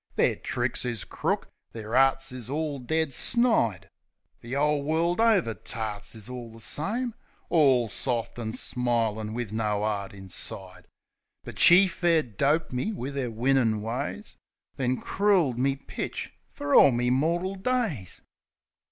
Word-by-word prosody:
Their - - +2
tricks - - -2
is 120 -5 -2
crook, - - -2 0.3
their 110 +1 -5
arts 135 0 +3
is 125 -2 -5
all 150 -1 -2
dead 160 +3 -1
snide. 225 - +3 0.5
The 120 +3 -6
'ole 150 +1 +2
world 165 +6 0
over 205 - +3
tarts 105 +1 -5
is 110 -2 -8
all 125 -2 -8
the 115 - -13
same; 220 - -1 0.4
All 135 -8 +4
soft 120 +1 -2
an' 110 -1 -4
smilin' 115 -4 -1
wiv 120 -4 -4
no 105 -2 -1
'eart 100 -2 -3
inside. 95 0 -7 0.6
But - - -9
she 180 +3 +8
fair 170 -3 +1
doped 140 +7 0
me 125 - -1
wiv 140 - -5
'er 130 -3 -2
winnin' 115 -2 +1
ways. 140 - -5 0.4
Then 130 -2 -1
crooled 185 - +1
me 135 +1 +1
pitch 140 - -6 0.2
fer 145 0 -4
all - - +8
me 125 -1 0
mortal 170 +8 0
days. 195 - -2
130 Hz, 145 wpm, -27 LUFS, 115-160 Hz, 0.6 s, she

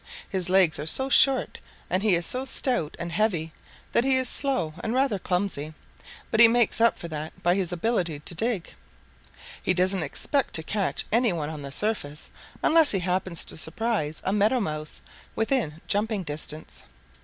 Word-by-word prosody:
His 185 -2 0
legs 185 -5 +3
are 150 - -5
so 265 +11 +3
short 270 0 +3 0.3
and 185 - 0
he 210 -3 +3
is 170 0 -2
so 255 +7 +2
stout 250 - +2
and 170 0 -5
heavy 170 -4 -1 0.4
that - - +3
he 265 0 +2
is 260 -1 +2
slow 215 - +3
and 225 +2 -2
rather 260 -6 +1
clumsy, 180 -5 -3 0.6
but 220 - +1
he 235 - +10
makes 230 -1 +1
up 230 - +4
for 170 - -7
that 155 +4 -7
by 175 0 +3
his 185 -2 -1
ability 175 -4 -1
to 160 - -5
dig. 220 -1 -3 0.9
He 185 - 0
doesn't 185 +1 +1
expect 280 - -2
to 160 - +1
catch 200 +3 -2
any 230 0 +3
one 155 -3 -3
on 155 -2 -7
the 140 -1 -7
surface, 150 -5 -3 0.3
unless 320 -1 +4
he 195 - +1
happens 180 -1 -2
to - - -3
surprise 160 -2 -2
a 190 - 0
Meadow 210 +5 +2
Mouse 155 -7 -4 0.3
within 220 - -1
jumping 210 -1 0
distance. 155 0 -6
190 Hz, 180 wpm, -25 LUFS, 160-230 Hz, 0.9 s, he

